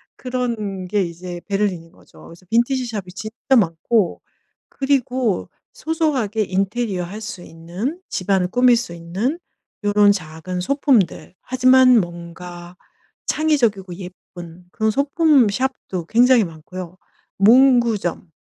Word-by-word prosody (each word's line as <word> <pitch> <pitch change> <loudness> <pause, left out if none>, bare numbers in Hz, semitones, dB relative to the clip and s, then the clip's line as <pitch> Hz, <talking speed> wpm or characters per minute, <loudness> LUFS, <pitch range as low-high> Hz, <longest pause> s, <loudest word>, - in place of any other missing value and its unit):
그런 230 -7 -3
게 205 +2 +1
이제 175 0 -7
베를린인 195 -5 -2
거죠. - - -19
그래서 170 +2 -15
빈티지 240 +3 +2
shop이 205 -6 -6
진짜 220 +7 -1
많고 190 0 +1 0.5
그리고 260 -6 0 0.2
소소하게 275 -10 -1
인테리어 195 +1 -1
할 200 +5 -8
수 210 -4 -7
있는 180 - -5
집 185 - -5
안을 185 -2 +2
꾸밀 245 +1 +4
수 230 -7 -5
있는 190 - -3 0.4
요런 205 0 +4
작은 180 0 -5
소품들. 255 - +1
하지만 255 -1 +5
뭔가 175 0 -8 0.5
창의적이고 235 - +1
예쁜 175 -1 -11
그런 220 +3 0
소품 280 0 +3
shop도 225 -7 -3
굉장히 245 +2 +5
많고요. 175 +2 -8 0.4
문구점 230 -5 +4
205 Hz, 280 characters per minute, -20 LUFS, 180-250 Hz, 0.5 s, 하지만